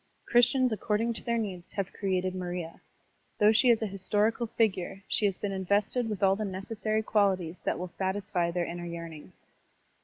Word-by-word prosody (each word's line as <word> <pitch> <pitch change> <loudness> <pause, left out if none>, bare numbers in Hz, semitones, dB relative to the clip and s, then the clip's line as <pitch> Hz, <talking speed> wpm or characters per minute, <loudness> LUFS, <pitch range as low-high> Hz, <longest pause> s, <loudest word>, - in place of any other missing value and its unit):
Christians 245 +1 +4
according 220 +2 0
to - - -2
their 235 -1 0
needs 190 -6 -5
have 195 -2 -3
created 185 -2 -1
Maria. 175 -2 -5 0.6
Though 210 +1 +6
she 235 +3 +4
is 230 -2 +4
a - - +1
historical 210 +4 +1
figure, 195 -4 -1
she 210 - +2
has 195 - -2
been 205 - -3
invested 200 +5 0
with 205 -2 -3
all 195 0 +5
the 215 - -3
necessary 215 +3 -2
qualities 190 -5 +1
that - - 0
will 180 - -4
satisfy 190 -2 -1
their 175 0 -1
inner 175 0 -5
yearnings. 170 -2 -9
195 Hz, 175 wpm, -29 LUFS, 180-220 Hz, 0.6 s, Though